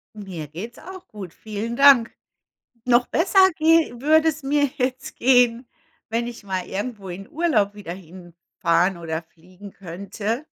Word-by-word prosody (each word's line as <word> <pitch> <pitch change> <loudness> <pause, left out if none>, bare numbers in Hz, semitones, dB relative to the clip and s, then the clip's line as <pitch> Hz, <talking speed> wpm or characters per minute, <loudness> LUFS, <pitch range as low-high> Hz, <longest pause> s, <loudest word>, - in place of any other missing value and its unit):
Mir 185 -8 -7
geht's 215 - -8
auch 375 +1 -11
gut. 195 -6 -9
Vielen 220 +2 -5
Dank. 275 -4 +6 0.7
Noch 245 0 +3
besser 380 +3 +4
gehe 315 -6 +3
würde 315 +3 +4
es 315 -1 -3
mir 285 +1 +1
jetzt 255 0 -3
gehen, 245 -1 +3 0.4
wenn 230 +2 -1
ich 235 -3 -9
mal 185 -2 -3
irgendwo 205 0 -5
in 185 +2 -8
Urlaub 280 -12 +1
wieder 205 -5 -7
hinfahren 175 0 -2
oder 165 -1 -4
fliegen 185 +5 -15
könnte. 200 - -5
220 Hz, 140 wpm, -22 LUFS, 185-265 Hz, 0.7 s, Dank